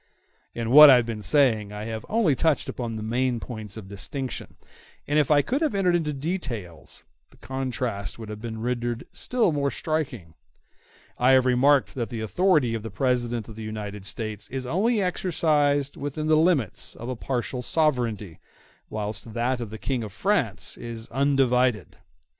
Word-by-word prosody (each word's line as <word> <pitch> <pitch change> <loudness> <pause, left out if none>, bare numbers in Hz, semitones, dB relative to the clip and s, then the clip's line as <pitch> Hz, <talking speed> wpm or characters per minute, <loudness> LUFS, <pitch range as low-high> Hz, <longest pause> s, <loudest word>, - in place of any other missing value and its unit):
In 115 0 -2
what 150 +2 +11
I 135 - +9
have 120 -2 +3
been 115 -2 -5
saying 110 -6 +2
I 105 0 -6
have 110 -1 -5
only 215 -9 +3
touched 160 +1 +1
upon 120 -3 -4
the 110 - -5
main 120 +2 0
points 110 -4 -7
of 105 -4 -8
distinction; 130 +6 -5 0.5
and 150 +1 +3
if 145 - +2
I 145 -1 +5
could 270 +5 -1
have 305 -9 +1
entered 180 -3 +3
into 160 -3 0
details, 135 - -4 0.3
the - - -22
contrast 125 -5 -3
would 110 -1 -8
have 105 0 -7
been 110 -1 -5
rendered 120 -1 -2
still 245 -7 +1
more 140 -2 0
striking. 135 - -3 0.9
I 125 +2 +5
have 130 -1 +5
remarked 130 +2 +3
that 120 -3 -3
the 115 -3 -5
authority 150 - +2
of 115 - -2
the 110 - -6
President 120 0 -1
in 110 - -9
the 110 - -9
United 105 -2 -5
States 105 0 -4
is 130 -1 -4
only 210 - +1
exercised 155 -6 +1
within 145 +2 -4
the 155 0 +4
limits 155 - +1
of 120 - -8
a 130 - -3
partial 125 +1 -3
sovereignty, 120 - 0 0.5
whilst 110 +1 -5
that 120 +1 0
of 115 - -5
the 110 - -7
King 130 +1 -2
in 110 - -5
France 110 - -1
is 115 -1 -7
undivided. 130 -5 +1
125 Hz, 175 wpm, -25 LUFS, 110-145 Hz, 0.9 s, what